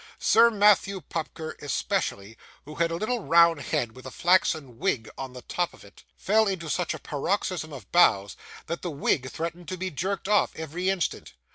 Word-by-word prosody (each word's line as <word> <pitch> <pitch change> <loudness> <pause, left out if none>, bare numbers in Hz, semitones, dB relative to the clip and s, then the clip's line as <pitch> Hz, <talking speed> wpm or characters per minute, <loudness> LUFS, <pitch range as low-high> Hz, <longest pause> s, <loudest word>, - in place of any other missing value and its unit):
Sir 230 +1 +5
Matthew 205 -2 +3
Pupker 160 +1 -5
especially, 140 - -2 0.3
who 150 - -9
had 165 +2 +1
a 165 - -2
little 225 +7 -1
round 170 -2 +5
head 145 -7 -1
with 130 +3 -12
a - - -5
flaxen 155 -6 +1
wig 125 - 0
on 130 -1 -7
the 125 -1 -10
top 175 -1 -2
of - - -17
it, 100 - -17
fell 220 +2 +3
into 170 -5 -3
such 175 -2 -1
a - - -9
paroxysm 160 +3 -2
of 140 -3 -10
bows, 100 - +4 0.3
that 170 - -4
the 175 - -3
wig 140 -3 0
threatened 170 +2 -5
to 185 - -4
be 185 +1 -3
jerked 190 +5 -3
off, 210 -1 +2
every 165 +4 -3
instant. 190 -4 -2
170 Hz, 185 wpm, -26 LUFS, 145-190 Hz, 0.3 s, Sir